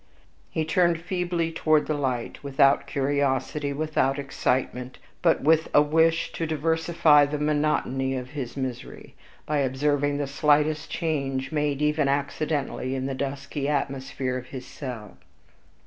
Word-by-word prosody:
He 160 - -1
turned 170 +1 +2
feebly 175 -1 -2
toward 155 -2 +2
the 155 - -1
light, 130 -5 -3
without 140 0 +3
curiosity, 140 0 0
without 140 -2 0
excitement, 130 -2 -2 0.2
but - - +3
with 160 +2 +4
a 145 - +8
wish 160 +2 +2
to 165 - -3
diversify 160 -1 +3
the 150 +1 -3
monotony 145 -3 0
of 125 0 -5
his 135 -4 -6
misery, 130 -2 -6 0.3
by 150 -1 0
observing 145 +2 +1
the 145 - -1
slightest 150 +2 +2
change 135 -5 -2
made 150 -2 0
even 150 -1 +2
accidentally 140 -1 -1
in 130 0 -2
the 135 - -2
dusky 140 +1 -3
atmosphere 135 -2 -2
of 125 - -12
his 130 -1 -8
cell. 125 -7 -8
145 Hz, 135 wpm, -25 LUFS, 135-155 Hz, 0.3 s, a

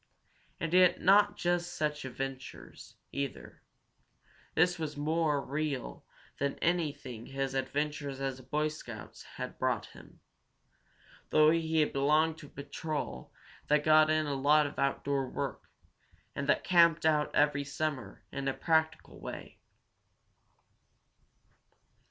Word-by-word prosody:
And 165 0 -3
yet 180 -1 +5
not 205 +2 +5
just 175 0 -1
such 150 -2 -2
adventures, 130 0 -7 0.2
either. 140 -1 -5 0.9
This 175 +2 +3
was 155 -2 -4
more 150 -1 0
real 145 -2 -3 0.4
than 140 0 -1
anything 145 -9 -2
his 135 0 -3
adventures 140 +1 -2
as 135 -1 -3
a - - -13
Boy 150 +4 0
Scout 120 -8 -9
had - - -6
brought - - 0
him, - - -15 1.1
though 155 0 +5
he 160 -1 +2
belonged 155 +4 +2
to 150 - -11
a - - -17
patrol 140 - -5 0.4
that 150 0 +3
got 155 0 +6
in 155 0 +2
a 145 - -2
lot 145 +3 +4
of 145 - -6
outdoor 140 -1 0
work, - - -5 0.7
and - - -3
that - - +3
camped 170 -3 +4
out 150 -2 +2
every 145 -1 +3
summer 140 -7 -4
in 140 -1 -4
a 135 - 0
practical 160 -1 0
way. - - -8
150 Hz, 125 wpm, -31 LUFS, 140-160 Hz, 1.1 s, got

